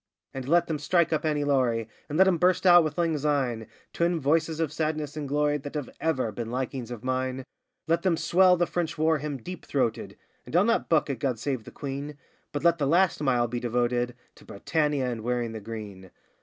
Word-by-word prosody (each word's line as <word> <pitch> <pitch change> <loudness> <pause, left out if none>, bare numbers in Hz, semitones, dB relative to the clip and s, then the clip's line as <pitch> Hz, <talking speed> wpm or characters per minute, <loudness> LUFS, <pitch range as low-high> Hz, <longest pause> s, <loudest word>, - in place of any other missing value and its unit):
And 130 0 -6
let 175 +2 +4
them 155 -2 -3
strike 170 +2 +2
up 155 - 0
'Annie 150 -2 +1
Laurie,' 125 -6 +1 0.2
And 150 - -2
let 190 +1 +6
'em 175 -3 +2
burst 180 +1 +2
out 175 -2 +8
with 155 -2 -3
'Lang 165 -3 +1
Syne,' 135 -6 -1 0.3
Twin 170 0 +1
voices 160 +2 +1
of 160 -3 -1
sadness 155 -2 -2
and 150 -2 -4
glory 150 +1 +1
That 145 +2 -8
have 145 -4 -4
ever 130 -8 0
been 115 +2 -5
likings 125 -1 -4
of 120 -2 -7
mine. 130 0 -2 0.4
Let 165 +1 +1
them 180 -3 +1
swell 180 +3 +4
the 175 - +2
French 165 -4 -3
war 160 0 +2
hymn 145 -1 -4
deep 180 +9 -8
throated 125 -5 -2 0.3
(And - - -8
I'll 180 - +6
not 230 +1 +1
buck 155 -3 +2
at 130 - -5
'God 130 -2 -1
Save 125 -1 -3
the - - -9
Queen'), 140 +1 -6 0.3
But 145 - -4
let 170 -1 +4
the 140 - +1
last 175 +2 +3
mile 125 -4 +2
be 120 +1 -3
devoted 120 0 0 0.2
To - - -16
'Britannia' 150 +5 -1
and 120 -3 -3
'Wearing 120 0 -1
the 110 -1 -7
Green. 100 -4 -8
145 Hz, 215 wpm, -27 LUFS, 125-160 Hz, 0.4 s, out